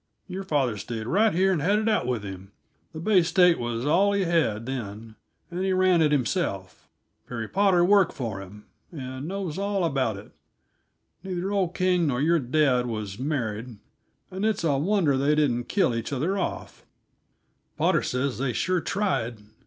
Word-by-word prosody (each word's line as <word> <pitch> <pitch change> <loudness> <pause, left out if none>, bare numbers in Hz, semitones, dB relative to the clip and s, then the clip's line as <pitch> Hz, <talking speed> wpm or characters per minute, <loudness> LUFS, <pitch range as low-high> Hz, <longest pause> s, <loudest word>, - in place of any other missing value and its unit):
Your 190 0 -5
father 140 - 0
stayed 110 +2 -5
right 210 - +3
here 190 +3 +2
and 160 - -1
had 200 +7 +2
it 215 +1 -1
out 215 - +1
with 120 -4 -1
him. 95 0 -9 0.4
The 160 - -8
Bay 190 +2 +4
State 175 +1 +4
was 120 +1 -3
all 190 +7 +3
he 200 -1 +1
had, 160 - +1
then, 110 -3 -6 0.4
and 180 +2 -3
he 190 0 +1
ran 185 -2 +3
it 150 -2 +3
himself. 125 - -2 0.4
Perry 115 -3 -5
Potter 190 - +3
worked 200 0 +4
for 110 -7 -4
him, 100 +2 -12 0.3
and 130 -2 -6
knows 190 -3 -4
all 200 -1 -1
about 130 -9 0
it. 100 - -12 0.9
Neither 190 0 -3
old 190 -3 0
King 180 -3 +2
nor 125 -3 0
your 165 +4 +3
dad 130 -2 +2
was 110 -3 -5
married, 120 -5 -3 0.5
and 190 +2 -4
it's 215 -4 0
a 150 -4 +2
wonder 165 -4 +2
they 140 +3 +2
didn't 125 -6 +1
kill 185 - +1
each 115 +2 -4
other 150 +8 -1
off 195 - -4 0.9
Potter - - +2
says 125 0 -2
they 130 -2 -1
sure 185 +5 0
tried. 125 - -2
150 Hz, 175 wpm, -26 LUFS, 120-185 Hz, 0.9 s, Bay